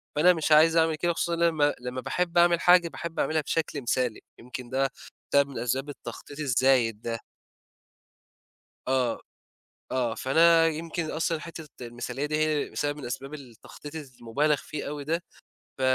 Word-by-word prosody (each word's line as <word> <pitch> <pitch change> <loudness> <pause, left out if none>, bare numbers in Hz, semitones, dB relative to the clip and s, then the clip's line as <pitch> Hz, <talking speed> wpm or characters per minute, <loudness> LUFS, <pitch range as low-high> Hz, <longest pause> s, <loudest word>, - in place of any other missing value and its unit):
فأنا 180 +4 +6
مش 160 -1 -2
عايز 160 +2 +6
أعمل 160 -1 +3
كده 170 +2 0
خصوصًا 170 +1 -1
إن 170 - -2
أنا 170 - +6
لمّا 145 -2 +2
لمّا 125 +1 -5
باحب 175 -1 -1
أعمل 170 -1 +5
حاجة، 175 -1 +6
باحب 170 0 -6
أعملها 155 0 +1
بشكل 155 -1 -2
مثالي، 125 -1 0 0.2
يمكن 125 0 -8
ده 135 +1 +1 0.4
سبب 140 0 +4
من 130 - -6
أسباب 130 +4 -1
التخطيط 145 0 -9
الزايد 125 -5 +2
ده. 115 -1 -3 1.7
آه. 130 -3 +1 0.7
آه. 120 -3 0
فأنا 165 +6 +5
يمكن 165 0 -3
أصلًا 165 0 -1
حتّة 165 -2 -8 0.2
المثالية 120 +4 -4
دي 150 0 -1
هي 155 -1 0
سبب 145 0 -1
من 145 - -8
أسباب 135 +4 -5
التخطيط 140 +3 -11
الز 140 -5 -8
المُبالغ 145 +6 +1
فيه 145 +1 -6
أوي 145 -1 -5
ده، 165 +3 -1 0.6
ف - - -12
150 Hz, 165 wpm, -27 LUFS, 130-165 Hz, 1.7 s, فأنا